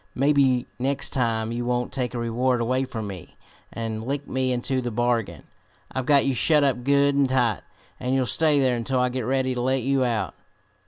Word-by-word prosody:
Maybe 135 -2 +3
next 135 +2 0
time 115 -4 -1
you 120 +1 -3
won't 125 0 -1
take 125 -2 -2
a - - -2
reward 120 +2 0
away 130 +3 0
from 110 -4 -5
me, 95 -4 -9 0.3
and 110 -1 -4
lick 140 +3 -3
me 130 0 -1
into 130 +1 -1
the 120 - -3
bargain. 120 -1 -1 0.5
I've 130 -1 -3
got 140 -2 +5
you 135 - +1
shut 150 +4 +3
up 130 -3 0
good 140 +1 +3
and 140 -1 +2
tight, 120 -6 +1 0.4
and 125 +1 -1
you'll 130 -1 +1
stay 150 +5 +2
there 130 -2 +2
until 125 +2 -1
I 125 0 +2
get 130 +1 -3
ready 130 0 0
to 125 - -3
let 130 0 0
you 135 0 +1
out." 110 - -1
125 Hz, 205 wpm, -24 LUFS, 120-135 Hz, 0.5 s, got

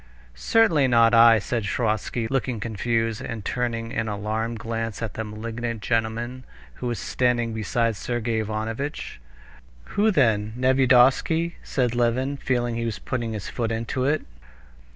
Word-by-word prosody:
"Certainly 160 - +3
not 115 -1 +5
I," 115 0 +8
said 115 +3 -2
Sviazhsky, 110 +2 -1
looking 130 -3 -1
confused, 115 +1 -1
and 115 -4 -6
turning 115 -2 -2
an 115 -1 -1
alarmed 110 +2 -2
glance 115 0 -4
at 110 - -4
the 110 - -4
malignant 115 +1 -5
gentleman, 115 +3 -1 0.3
who 125 - -5
was 120 -2 -2
standing 120 +3 0
beside 115 +1 0
Sergey 115 0 -2
Ivanovitch. 110 - -4 0.7
"Who 210 +2 +3
then? 110 - +2
Nevyedovsky?" 130 +6 +4
said 125 -3 -1
Levin, 125 +4 0
feeling 120 -3 -1
he 115 - -2
was 110 -3 -2
putting 115 +3 -3
his 105 -3 -5
foot 115 -2 -2
into 115 +3 -2
it. 150 +3 +1
115 Hz, 140 wpm, -24 LUFS, 110-125 Hz, 0.7 s, I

